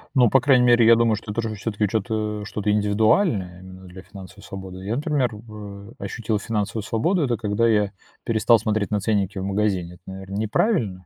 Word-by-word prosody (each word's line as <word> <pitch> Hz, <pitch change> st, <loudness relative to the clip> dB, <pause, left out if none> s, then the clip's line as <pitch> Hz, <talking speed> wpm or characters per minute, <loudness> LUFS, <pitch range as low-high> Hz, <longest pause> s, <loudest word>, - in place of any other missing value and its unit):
Ну, 125 Hz, -4 st, +5 dB
по 135 Hz, -, +5 dB
крайней 125 Hz, -1 st, +4 dB
мере, 120 Hz, -1 st, +5 dB
я 115 Hz, +1 st, +7 dB
думаю, 115 Hz, -1 st, +2 dB
что 105 Hz, 0 st, -7 dB
это 115 Hz, -, -4 dB
уже 110 Hz, -1 st, -2 dB
всё-таки 105 Hz, 0 st, -2 dB
чё-то 105 Hz, 0 st, -2 dB
что-то 105 Hz, -1 st, -2 dB
индивидуальное 105 Hz, -, +1 dB
именно 95 Hz, 0 st, -12 dB
для 90 Hz, +1 st, -11 dB
финансовой 100 Hz, 0 st, -13 dB
свободы. 95 Hz, -1 st, -9 dB
Я, 110 Hz, +4 st, -1 dB
например, 145 Hz, -4 st, 0 dB
в, 105 Hz, -1 st, -10 dB
э, -, -, -14 dB
ощутил 105 Hz, +2 st, -3 dB
финансовую 105 Hz, 0 st, -3 dB
свободу, 150 Hz, -, 0 dB
это 120 Hz, -4 st, 0 dB
когда 105 Hz, +1 st, 0 dB
я 105 Hz, -3 st, +2 dB, 0.3 s
перестал 115 Hz, 0 st, +3 dB
смотреть 110 Hz, -2 st, -1 dB
на 105 Hz, -, +1 dB
ценники 100 Hz, -1 st, -1 dB
в 95 Hz, -, -3 dB
магазине. 95 Hz, -3 st, -1 dB
Это, 90 Hz, -, -24 dB
наверно, 95 Hz, +1 st, -8 dB
неправильно, 105 Hz, -, 0 dB
105 Hz, 195 wpm, -23 LUFS, 100-115 Hz, 0.3 s, я